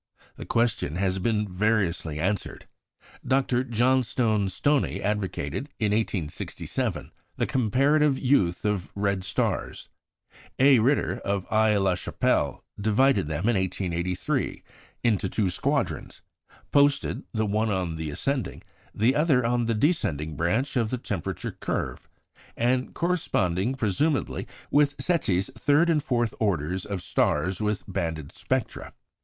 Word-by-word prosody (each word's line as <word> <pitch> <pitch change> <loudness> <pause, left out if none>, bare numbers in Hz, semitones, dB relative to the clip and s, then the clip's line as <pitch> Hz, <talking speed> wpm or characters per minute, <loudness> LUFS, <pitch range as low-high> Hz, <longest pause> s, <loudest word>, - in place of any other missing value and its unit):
The - - -9
question 115 -10 0
has 95 +1 0
been 105 +1 0
variously 90 -5 0
answered. 95 +5 -2 0.6
Dr. 130 -2 +1
Johnstone 120 -4 +1
Stoney 145 +8 +1
advocated, 100 - -2
in 105 -3 0
1867, 105 -7 -2 0.3
the - - +1
comparative 135 +4 +2
youth 105 -12 +2
of 105 -4 -1
red 100 -2 0
stars; - - -2 0.7
A. 135 -1 +6
Ritter, 130 +6 +1
of 100 -2 -2
Aix 110 -1 +4
la 95 -1 +2
Chapelle, 90 - 0 0.2
divided 110 - +3
them, 80 +7 -2
in 120 - +3
1883, 90 -1 -2 0.4
into 105 -5 +1
two 100 -3 0
squadrons, - - -2 0.5
posted, 145 0 +3
the 110 -1 0
one 110 +2 0
on 90 -5 -1
the 80 -1 -4
ascending, 130 - -2 0.3
the 120 +6 +3
other 145 -5 +3
on 120 0 +1
the 115 - +1
descending 80 - 0
branch 110 - 0
of 115 -4 +1
the 125 - -1
temperature 100 -7 -4
curve, - - -4 0.5
and 125 +2 0
corresponding, 120 - 0
presumably, 130 - 0 0.2
with 145 0 +3
Secchi's 100 - 0
third 150 +4 +3
and 155 -2 +2
fourth 120 -5 0
orders 90 -3 -1
of 100 -3 -4
stars 95 +3 0
with 105 -1 -1
banded 80 -6 -3
spectra. - - -3
105 Hz, 125 wpm, -26 LUFS, 95-130 Hz, 0.7 s, A